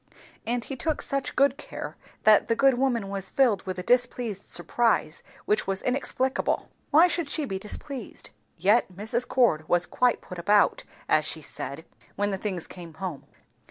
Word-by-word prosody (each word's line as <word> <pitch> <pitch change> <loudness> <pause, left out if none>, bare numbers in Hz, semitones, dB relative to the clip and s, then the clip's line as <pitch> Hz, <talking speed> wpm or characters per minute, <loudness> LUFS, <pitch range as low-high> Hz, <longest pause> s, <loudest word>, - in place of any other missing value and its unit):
And 240 0 0
he 270 - -5
took 310 +3 -1
such 275 -1 -2
good 275 0 +3
care, - - -7 0.3
that 215 -1 +6
the 230 - +2
good 270 +3 +4
woman 245 -5 0
was 195 -1 -4
filled 235 -8 +3
with 185 -1 -3
a 180 - -4
displeased 245 -3 0
surprise 230 -9 +2 0.2
which 210 -1 +1
was 195 0 -1
inexplicable. 260 0 0 0.2
Why 325 +4 +6
should 340 -4 -1
she 305 0 -1
be 190 -7 -4
displeased? 240 +4 -5 0.3
Yet 200 +4 +3
Mrs. 220 +6 -3
Cord 160 -12 +2
was 175 0 +3
quite 250 -1 +1
"put 180 - -9
about," 205 +4 +3 0.2
as - - +3
she - - -4
said, - - -5 0.3
when 205 0 0
the 195 - -3
things 185 -5 -3
came 170 -3 -10
home. 185 -7 -6
225 Hz, 170 wpm, -26 LUFS, 190-260 Hz, 0.3 s, that